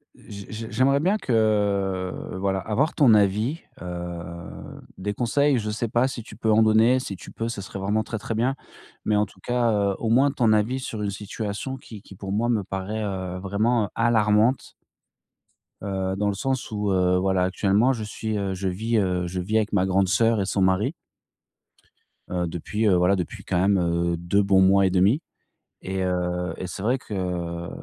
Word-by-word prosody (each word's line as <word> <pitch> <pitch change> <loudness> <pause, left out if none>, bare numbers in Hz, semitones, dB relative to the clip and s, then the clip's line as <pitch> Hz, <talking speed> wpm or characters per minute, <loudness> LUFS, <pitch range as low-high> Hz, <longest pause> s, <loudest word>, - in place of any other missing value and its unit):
Je 100 -1 -10
je 110 +1 -6
j'aimerais 130 +5 +3
bien 190 +8 +2
que, 100 - +1 0.2
voilà, 95 0 -1
avoir 115 - 0
ton 125 -8 +5
avis, 105 - +1 0.2
heu, 90 -1 -5 0.8
des 105 +2 -3
conseils, 140 +4 +2
je 110 -2 -2
sais 115 +2 -2
pas 120 +3 +2
si 120 -3 -5
tu - - -12
peux 110 - 0
en 110 +1 +5
donner, 110 +4 +5
si 105 -6 -5
tu - - -12
peux, 115 +1 -3
ce 110 -4 -5
serait 100 0 -7
vraiment 105 +3 0
très, 110 -3 -5
très 115 - -4
bien. 125 +4 +1 0.5
Mais 105 - +2
en 105 0 +3
tout 100 - -19
cas, 120 -1 +1
heu, 100 -2 +1
au 115 - -2
moins 135 +4 +5
ton 115 -5 +2
avis 110 +5 +1
sur 115 -4 -5
une 105 - -1
situation 105 +5 -5
qui 110 -4 -12
qui, - - -13
pour 95 +1 -6
moi, 110 +4 +1
me 110 -4 +1
paraît, 95 +3 -4
heu, 95 -3 -4
vraiment 105 +3 +1
alarmante 115 +1 +2 1.1
heu, 95 -1 -2
dans 105 +1 0
le - - 0
sens 130 +4 -2
où, 105 -1 -1
heu, 90 -1 +3
voilà, 95 0 +1
actuellement, 100 +7 +2
je 115 -4 -4
suis, 110 +1 -4
heu, 100 -1 -2
je 95 +1 -3
vis, 110 +5 -1
heu, 90 -3 0
je 90 +1 -4
vis 105 +5 0
avec 110 -1 0
ma 95 -2 +3
grande 95 0 +2
sœur 110 +2 +2
et - - 0
son 95 0 -1
mari 95 0 +2 1.4
heu, 90 -1 -1
depuis, 95 +6 -3
heu, 95 - +5
voilà, 90 +2 +3
depuis 90 -3 -5
quand 90 - 0
même, 100 +2 +3
heu, 85 0 0
2 85 +4 +1
bons 100 -1 +4
mois 95 +1 +5
et - - +3
demi. 95 - +3 0.6
Et, 95 0 -3
heu, 90 -1 -1
et 95 - -5
c'est 95 +1 -7
vrai 125 +5 +1
que 90 -5 -4
100 Hz, 200 wpm, -24 LUFS, 95-115 Hz, 1.4 s, ton